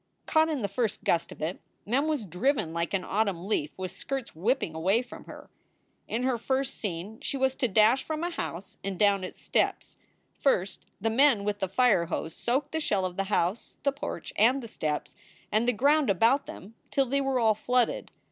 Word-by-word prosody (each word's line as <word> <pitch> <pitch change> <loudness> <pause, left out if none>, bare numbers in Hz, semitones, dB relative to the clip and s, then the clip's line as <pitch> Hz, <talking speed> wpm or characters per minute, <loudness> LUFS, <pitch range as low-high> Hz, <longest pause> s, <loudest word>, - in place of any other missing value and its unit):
Caught 315 0 +3
in 295 -5 -1
the - - +1
first 215 +2 -2
gust 170 - +1
of - - -8
it, 165 +4 -3 0.2
Mem 265 +8 +1
was 300 -8 -1
driven 195 - 0
like 170 +3 -1
an 185 - -1
autumn 200 -4 -1
leaf 155 -8 -1
with 185 -1 -4
skirts 260 +5 -5
whipping 200 - 0
away 190 +9 +2
from 250 - -11
her. - - -12 0.6
In 235 +3 -2
her 255 -2 +1
first 265 +3 -1
scene 200 +2 -5
she 275 - -2
was 265 0 +1
to 260 - +1
dash 220 +5 +4
from 315 +1 -3
a 350 - -1
house 190 - -6
and 195 -2 -3
down 200 -1 +3
its 185 - -7
steps. - - -1 0.4
First, 195 -9 0
the 225 +3 0
men 250 -3 +4
with 205 0 -1
the 190 -2 -1
fire 195 -5 +3
hose 160 -1 -3
soaked 270 +5 -1
the 320 - -1
shell 205 -11 +1
of 180 -1 -4
the 195 - -1
house, 190 +1 -1
the 280 - +3
porch, 280 - -6
and 250 +5 +4
the - - -6
steps, 155 -8 -3 0.4
and 220 +3 +2
the - - +5
ground 285 +4 +3
about 230 +9 +3
them 200 +4 -10 0.2
till 275 - +2
they 275 +2 0
were 270 -2 +1
all 220 -2 +4
flooded. 245 +3 0
220 Hz, 205 wpm, -28 LUFS, 190-265 Hz, 0.6 s, the